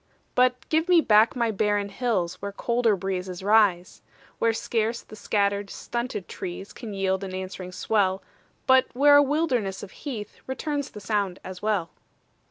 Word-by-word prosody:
But 250 0 +2
give 320 +3 +1
me 355 -2 +7
back 220 -5 +4
my 235 -2 +1
barren 205 -1 0
hills 195 -6 -1
Where 200 0 -4
colder 235 +1 +1
breezes 185 -1 -4
rise; 200 -4 +3 0.4
Where 230 - +3
scarce 225 +1 -1
the 215 - -12
scattered, 200 -1 0
stunted 235 -5 -4
trees 180 +2 -7
Can 220 -5 -7
yield 190 0 0
an 185 -1 -5
answering 185 -1 -6
swell, 190 -1 0 0.4
But 260 0 +5
where 285 +3 +6
a - - +8
wilderness 265 - 0
of 195 - -9
heath 225 -8 -7
Returns 285 +2 -3
the 210 - -10
sound 200 -3 -1
as 185 -1 -8
well. 200 -7 0
210 Hz, 160 wpm, -25 LUFS, 190-245 Hz, 0.4 s, a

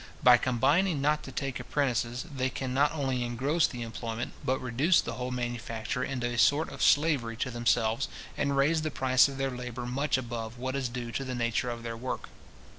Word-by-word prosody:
By 125 -1 +8
combining 140 +8 +2
not 150 +2 +2
to - - -8
take 135 -3 -3
apprentices, 125 -3 -1
they 130 0 0
can 130 0 -4
not 145 +2 +3
only 135 -5 -1
engross 135 +7 +1
the 120 -3 -6
employment, 115 +1 -5
but 130 +1 +1
reduce 135 +8 +3
the 115 - -2
whole 125 +2 -4
manufacture 120 0 -3
into 130 -2 -2
a 120 -1 -1
sort 150 +5 +4
of - - -8
slavery 140 -7 +3
to 130 - -2
themselves, 120 +1 +1 0.3
and 140 -1 0
raise 155 +4 +3
the 155 - -1
price 130 -2 +4
of 135 -1 -7
their 135 0 -1
labour 125 -1 -5
much 135 +4 0
above 120 -2 -5
what 130 +2 -3
is 130 -3 -1
due 120 -1 -5
to 125 +5 -2
the 130 -1 -4
nature 120 +1 0
of 120 -1 -5
their 115 -1 -4
work. 125 +3 -5
125 Hz, 200 wpm, -29 LUFS, 120-140 Hz, 0.3 s, By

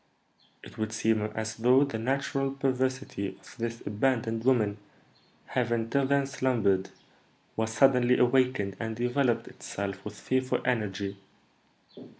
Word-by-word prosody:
It - - -12
would 110 0 -2
seem 110 0 +1
as 110 0 -3
though 125 +4 +5
the 140 -6 -3
natural 135 +2 0
perversity 130 -6 -2
of - - -15
this 115 0 -4
abandoned 115 +1 0
woman, 110 -5 +2 0.7
having 115 -2 -1
till 140 -1 +2
then 140 0 +2
slumbered, 115 -8 +1 0.7
was 110 0 -1
suddenly 125 +1 +4
awakened, 125 -5 +2
and 110 -1 -3
developed 120 -1 +1
itself 100 -1 -6
with 105 - -8
fearful 130 0 0
energy. 100 -4 -1
120 Hz, 125 wpm, -29 LUFS, 110-130 Hz, 0.7 s, though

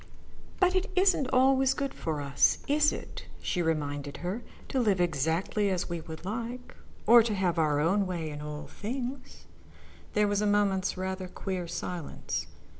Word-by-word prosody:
"But 365 -1 +4
it 375 +3 +1
isn't 365 -8 +3
always 265 0 +4
good 275 -2 -2
for 155 -3 -3
us, 140 -1 +3
is 300 +1 +4
it," - - -8
she 180 - -1
reminded 145 -3 -2
her, 195 +7 -2 0.3
"to 265 - 0
live 205 -6 +2
exactly 170 +5 +1
as 185 -2 -1
we 170 -1 -3
would 160 +2 -9
like, 235 +4 -5 0.3
or 235 +2 +9
to 220 -2 -1
have 180 -3 +1
our 150 -2 +2
own 190 +6 +2
way 165 -4 -3
in 150 0 -7
all 150 0 -6
things?" 255 +4 -6 0.7
There 210 0 +3
was 205 0 +1
a 210 - +2
moment's 200 -2 +2
rather 185 0 -3
queer 180 -1 -4
silence. 170 -1 -4
190 Hz, 165 wpm, -29 LUFS, 165-240 Hz, 0.7 s, or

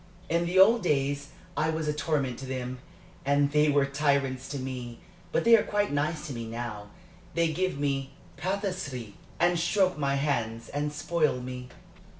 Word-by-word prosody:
In 170 +1 +1
the 180 +2 0
old 220 +5 +7
days 145 -4 0 0.3
I 155 - +1
was 160 -1 -1
a 150 - +1
torment 150 -5 -1
to 135 - -7
them, 130 -1 -4 0.4
and 140 +1 +3
they 150 +1 +4
were 145 -1 +4
tyrants 140 -2 0
to 140 - -3
me. 125 -3 -5 0.3
But - - +1
they 230 0 +8
are 220 - +4
quite 205 -3 0
nice 150 +2 -1
to 140 - -5
me 115 -2 -5
now 110 -3 -5 0.5
they 165 -1 +2
give 185 -2 0
me 140 -1 -1 0.2
patisserie, 175 - -3 0.3
and 175 0 +3
stroke 185 0 +2
my 140 -1 +1
hands 115 -5 -1
and 145 +1 -2
spoil 150 -2 +1
me." 125 0 -6
145 Hz, 170 wpm, -28 LUFS, 130-165 Hz, 0.5 s, they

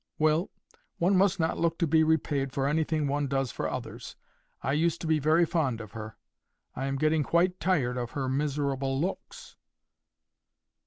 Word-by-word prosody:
Well, 155 +3 +2 0.5
one 185 +3 +2
must 190 -1 +3
not 160 0 0
look 165 0 +1
to 170 - +1
be 160 0 +4
repaid 145 -4 +1
for 135 0 0
anything 155 0 0
one 145 +1 0
does 135 -3 -1
for - - -3
others. - - -6 0.5
I 135 - 0
used 165 +2 +1
to - - -5
be 160 -1 +2
very 160 +4 +4
fond 145 -9 0
of 110 -2 -9
her: 110 -1 -8 0.6
I 135 - -3
am 135 - -1
getting 155 +2 +2
quite 180 +4 +1
tired 140 -10 +1
of 120 -1 -4
her 135 -2 -1
miserable 135 -1 -1
looks." 180 +6 -5
150 Hz, 170 wpm, -28 LUFS, 135-165 Hz, 0.6 s, be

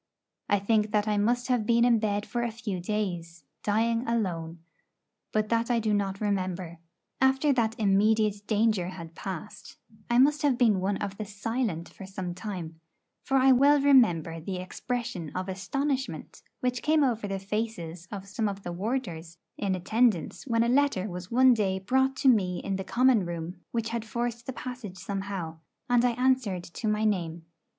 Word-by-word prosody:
I 205 - +4
think 210 +1 +1
that 210 0 +2
I 210 -1 +1
must 240 +4 +1
have 250 -4 +2
been 235 0 +4
in 235 -2 +4
bed 205 -1 -1
for 240 - -2
a 240 - 0
few 220 -4 -4
days, 175 -4 -3 0.2
dying 230 +3 +1
alone; 175 -8 -1 0.7
but 215 0 0
that 230 +1 +1
I 240 -1 +3
do 215 -1 0
not 195 -1 -1
remember. 185 -4 -2 0.4
After 265 +2 +4
that 225 -3 +1
immediate 210 0 +2
danger 215 -4 +2
had 170 -3 -8
passed, 195 +4 -7 0.3
I 240 - +3
must 290 +3 +5
have 280 -4 +2
been 225 -6 +4
one 195 +1 0
of 200 -1 -5
the 215 - -4
silent 205 -3 -2
for 195 - -11
some 190 -2 -5
time; 175 -4 -6 0.4
for 270 - +1
I 265 0 +6
well 280 +3 +6
remember 215 - +4
the 185 +4 -5
expression 210 -1 -4
of 185 +1 -2
astonishment 265 +8 -3 0.2
which 250 -1 -1
came 305 -1 +3
over 230 -5 0
the 195 -1 -2
faces 195 -4 -4
of 195 -1 -6
some 210 +2 -1
of 195 0 -7
the 175 - -4
warders 175 -5 -3 0.2
in 195 -2 0
attendance 215 - +1
when 230 -2 +2
a - - +1
letter 250 -6 +2
was 180 +1 -7
one 255 +1 +6
day 195 -4 0
brought 265 +7 +1
to 265 - 0
me 190 -8 +4
in 195 -1 -3
the 190 - -4
common 245 +1 +3
room 170 +1 -5
which 230 -1 -2
had 230 -1 -2
forced 235 0 -3
the - - -2
passage 245 -7 -7
somehow, 190 -3 -4 0.3
and 245 -1 +3
I 245 -1 +3
answered 250 -7 +1
to 190 +6 -5
my 210 0 +1
name. 170 -5 -1
210 Hz, 180 wpm, -28 LUFS, 185-240 Hz, 0.7 s, I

